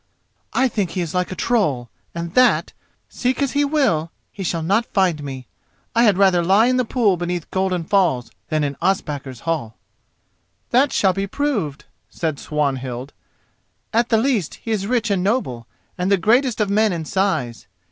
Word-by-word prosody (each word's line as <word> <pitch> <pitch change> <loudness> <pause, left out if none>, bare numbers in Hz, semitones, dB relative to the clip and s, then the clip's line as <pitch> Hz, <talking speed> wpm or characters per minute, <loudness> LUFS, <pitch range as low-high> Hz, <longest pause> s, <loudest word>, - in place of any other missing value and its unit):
"I 265 - +2
think 205 -7 -1
he 185 - -3
is 170 -1 -4
like 180 0 -1
a - - -4
troll, 150 - 0 0.2
and 170 0 -5
that, 255 0 +3 0.3
seek 255 0 -1
as 280 -2 +1
he 285 0 +2
will, 270 - +1 0.2
he 200 - -9
shall 170 -3 -1
not 205 +8 +1
find 180 -6 +1
me. 135 -2 -6 0.5
I 230 - +4
had 205 -4 +4
rather 190 -3 +4
lie 195 +6 +4
in 255 +1 +2
the 255 - +1
pool 220 -6 +2
beneath 175 -1 -4
Golden 185 -2 0
Falls 160 - +1 0.2
than 155 -2 +1
in 140 -1 -2
Ospakar's 145 -9 -2
hall." 155 -10 -3 0.9
"That 260 +3 +4
shall 190 -2 +3
be 195 +1 -2
proved," 195 - -2 0.2
said 160 -4 -3
Swanhild. 135 -3 -3 0.8
"At 235 +1 +2
the 225 - +4
least 225 - 0
he 225 - -6
is 200 -2 -1
rich 230 -2 0
and 190 -3 +1
noble, 185 - -1 0.3
and 180 +2 0
the 200 - +5
greatest 235 +6 +2
of 205 -2 +1
men 215 +1 +3
in 165 -2 -4
size. 155 - -1
190 Hz, 175 wpm, -21 LUFS, 155-225 Hz, 0.9 s, the